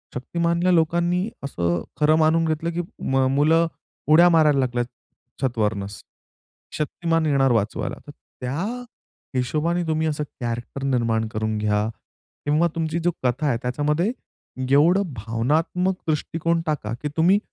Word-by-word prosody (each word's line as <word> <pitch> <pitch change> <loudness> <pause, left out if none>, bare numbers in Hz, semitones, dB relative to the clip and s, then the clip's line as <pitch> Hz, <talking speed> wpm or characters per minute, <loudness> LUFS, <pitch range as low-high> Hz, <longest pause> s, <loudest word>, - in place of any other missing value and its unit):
शक्तिमानल्या 170 +6 0
लोकांनी 175 +4 +2
असं 85 - -1 0.2
खरं 150 +1 +5
मानून 160 +1 +3
घेतलं, 160 +1 -1
की 175 - -1 0.3
मग 135 0 +3
मुलं 160 +3 +4 0.4
उड्या 170 +3 +8
मारायला 155 -4 +4
लागल्यात 120 -2 0 0.6
छत 130 -3 -1
वरनच. 100 -1 -2 0.8
शक्तिमान 165 +2 0
येणार 135 -3 +3
वाचवायला. 110 -2 0
तर 145 - -8 0.3
त्या 125 +5 -2 0.8
हिशोबाने 155 +7 0
तुम्ही 160 0 +1
असं 150 -1 -1 0.2
कॅरेक्टर 120 +3 -4
निर्माण 115 -4 +1
करून 110 0 -2
घ्या 105 0 +1 0.6
किंवा 155 +4 +3
तुमची 165 0 -1
जो 175 - +3
कथा 130 +4 +1
आहे 120 - +2
त्याच्यामध्ये 150 - 0 0.6
एवढं 170 +8 +5
भावनात्मक 145 - 0
दृष्टिकोन 165 +2 0
टाका, 135 -8 -2
की 125 +5 -4
तुम्ही 180 +5 +5
150 Hz, 130 wpm, -23 LUFS, 120-165 Hz, 0.8 s, उड्या